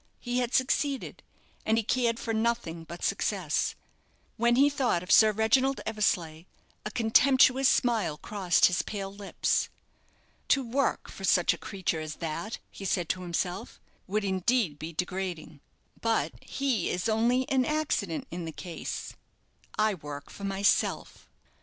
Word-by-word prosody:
He 245 Hz, 0 st, -1 dB
had 245 Hz, -1 st, -1 dB
succeeded, 275 Hz, +1 st, 0 dB, 0.4 s
and 220 Hz, +1 st, +2 dB
he 225 Hz, -, +1 dB
cared 235 Hz, 0 st, +1 dB
for 225 Hz, -, -3 dB
nothing 220 Hz, -8 st, -1 dB
but 170 Hz, +1 st, -9 dB
success. -, -, 0 dB, 0.6 s
When 235 Hz, +1 st, +3 dB
he 275 Hz, +3 st, +6 dB
thought 255 Hz, -11 st, 0 dB
of 180 Hz, -, -5 dB
Sir 220 Hz, -1 st, +7 dB
Reginald 255 Hz, +6 st, +2 dB
Eversleigh, 175 Hz, -7 st, -1 dB, 0.4 s
a -, -, -3 dB
contemptuous 260 Hz, +3 st, +4 dB
smile 225 Hz, -, +1 dB
crossed 190 Hz, -1 st, +2 dB
his 180 Hz, 0 st, +3 dB
pale 195 Hz, -2 st, -5 dB
lips. 200 Hz, -1 st, -1 dB, 0.8 s
"To 270 Hz, -2 st, +3 dB
work 270 Hz, +3 st, 0 dB
for 195 Hz, -, -10 dB
such 180 Hz, -2 st, +4 dB
a -, -, -7 dB
creature 185 Hz, -4 st, -2 dB
as 155 Hz, -1 st, -5 dB
that," 165 Hz, +7 st, -4 dB
he -, -, -10 dB
said 175 Hz, -3 st, -1 dB
to 185 Hz, -, -1 dB
himself, 180 Hz, +1 st, -3 dB, 0.3 s
"would 210 Hz, +2 st, -1 dB
indeed 190 Hz, -, +1 dB
be 160 Hz, +2 st, -5 dB
degrading; 180 Hz, -4 st, -4 dB, 0.4 s
but 230 Hz, -1 st, +1 dB
he 265 Hz, -9 st, -1 dB
is 180 Hz, +5 st, -1 dB
only 235 Hz, +4 st, +2 dB
an 260 Hz, -1 st, +3 dB
accident 270 Hz, -, -1 dB
in 175 Hz, 0 st, -5 dB
the 160 Hz, -, -5 dB
case 170 Hz, +1 st, -6 dB, 0.6 s
I 215 Hz, 0 st, +3 dB
work 145 Hz, -5 st, -8 dB
for 200 Hz, -, -7 dB
myself." 195 Hz, +1 st, 0 dB
210 Hz, 145 wpm, -28 LUFS, 175-245 Hz, 0.8 s, Sir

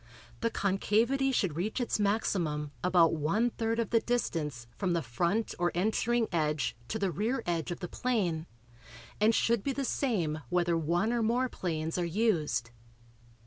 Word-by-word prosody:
The 230 Hz, -, +1 dB
concavity 225 Hz, +8 st, +1 dB
should 190 Hz, -, 0 dB
reach 200 Hz, +9 st, -2 dB
its 240 Hz, -3 st, 0 dB
maximum 175 Hz, -8 st, 0 dB
about 175 Hz, -3 st, +4 dB
one 165 Hz, +10 st, +1 dB
third 225 Hz, 0 st, -1 dB
of 230 Hz, -3 st, -1 dB
the 230 Hz, -, +5 dB
distance 160 Hz, -, -2 dB
from 185 Hz, -3 st, 0 dB
the 170 Hz, -, 0 dB
front 170 Hz, -, 0 dB
or 175 Hz, 0 st, +2 dB
entering 220 Hz, +5 st, +1 dB
edge 150 Hz, -6 st, 0 dB
to 220 Hz, -, -2 dB
the 195 Hz, -4 st, 0 dB
rear 225 Hz, -, -1 dB
edge 170 Hz, -3 st, -1 dB
of 175 Hz, -, -5 dB
the 175 Hz, -, -3 dB
plane 180 Hz, -9 st, -1 dB, 0.7 s
and 220 Hz, +2 st, +4 dB
should 235 Hz, -2 st, +2 dB
be 275 Hz, -, 0 dB
the 275 Hz, +1 st, -2 dB
same 180 Hz, -, 0 dB
whether 175 Hz, -1 st, +2 dB
one 175 Hz, +8 st, +1 dB
or 240 Hz, -, +1 dB
more 245 Hz, +3 st, +1 dB
planes 160 Hz, -3 st, -3 dB
are -, -, +1 dB
used. 170 Hz, -, 0 dB
190 Hz, 165 wpm, -30 LUFS, 165-230 Hz, 0.7 s, the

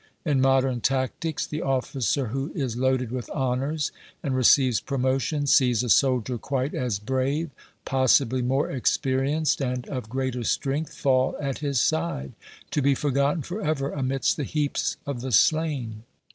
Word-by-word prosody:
In 145 Hz, -4 st, +2 dB
modern 135 Hz, -2 st, +2 dB
tactics, 135 Hz, +5 st, -1 dB
the 150 Hz, -, -4 dB
officer 130 Hz, -2 st, -1 dB
who 135 Hz, +5 st, -3 dB
is 130 Hz, -8 st, -2 dB
loaded 130 Hz, -1 st, 0 dB
with 125 Hz, -2 st, -5 dB
honours 135 Hz, +3 st, -1 dB, 0.3 s
and 135 Hz, -2 st, -1 dB
receives 130 Hz, -1 st, +4 dB
promotion 135 Hz, +2 st, -1 dB
sees 125 Hz, -4 st, +4 dB
a 125 Hz, -, -3 dB
soldier 125 Hz, -2 st, +2 dB
quite 135 Hz, +3 st, -2 dB
as 125 Hz, -5 st, -1 dB
brave, 130 Hz, +8 st, -1 dB, 0.3 s
possibly 130 Hz, -1 st, +3 dB
more 135 Hz, +3 st, +1 dB
experienced 135 Hz, +4 st, 0 dB
and 125 Hz, -2 st, -2 dB
of 125 Hz, -5 st, -5 dB
greater 130 Hz, -1 st, -2 dB
strength, 150 Hz, +6 st, -1 dB
fall 130 Hz, -1 st, +2 dB
at 140 Hz, -2 st, -3 dB
his 140 Hz, -4 st, 0 dB
side, 155 Hz, -, -1 dB, 0.4 s
to 145 Hz, -, +1 dB
be 140 Hz, 0 st, +3 dB
forgotten 140 Hz, +3 st, 0 dB
for 190 Hz, +9 st, -5 dB
ever 145 Hz, -5 st, -1 dB
amidst 135 Hz, -1 st, 0 dB
the 150 Hz, -, -2 dB
heaps 145 Hz, +1 st, -1 dB
of 140 Hz, -4 st, -4 dB
the 130 Hz, +1 st, -4 dB
slain. 130 Hz, -4 st, +2 dB
135 Hz, 150 wpm, -25 LUFS, 125-145 Hz, 0.4 s, receives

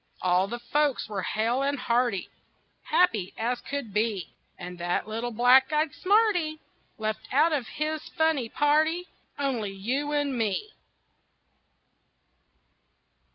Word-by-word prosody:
All 180 Hz, +1 st, +3 dB
the 240 Hz, -, -4 dB
folks 280 Hz, +3 st, 0 dB
were 205 Hz, -3 st, -3 dB
hale 230 Hz, +7 st, 0 dB
and 280 Hz, +1 st, 0 dB
hearty, 240 Hz, -5 st, 0 dB, 0.6 s
Happy 215 Hz, -, +2 dB
as 240 Hz, +2 st, -1 dB
could 280 Hz, -7 st, -5 dB
be; 210 Hz, -3 st, -1 dB, 0.2 s
And 180 Hz, 0 st, -8 dB
that 175 Hz, +4 st, -1 dB
little 225 Hz, +3 st, -3 dB
black 245 Hz, +4 st, +5 dB
eyed 305 Hz, -1 st, +1 dB
smarty 370 Hz, -6 st, +2 dB, 0.4 s
Left 215 Hz, 0 st, -4 dB
out 310 Hz, +5 st, +4 dB
of 265 Hz, -6 st, -1 dB
his 310 Hz, 0 st, -3 dB
funny 320 Hz, -8 st, +1 dB
party 315 Hz, +4 st, +2 dB, 0.3 s
Only 250 Hz, -8 st, -1 dB
you 255 Hz, +10 st, -2 dB
and 290 Hz, -2 st, 0 dB
me. 225 Hz, -, -1 dB
250 Hz, 120 wpm, -27 LUFS, 215-300 Hz, 0.6 s, black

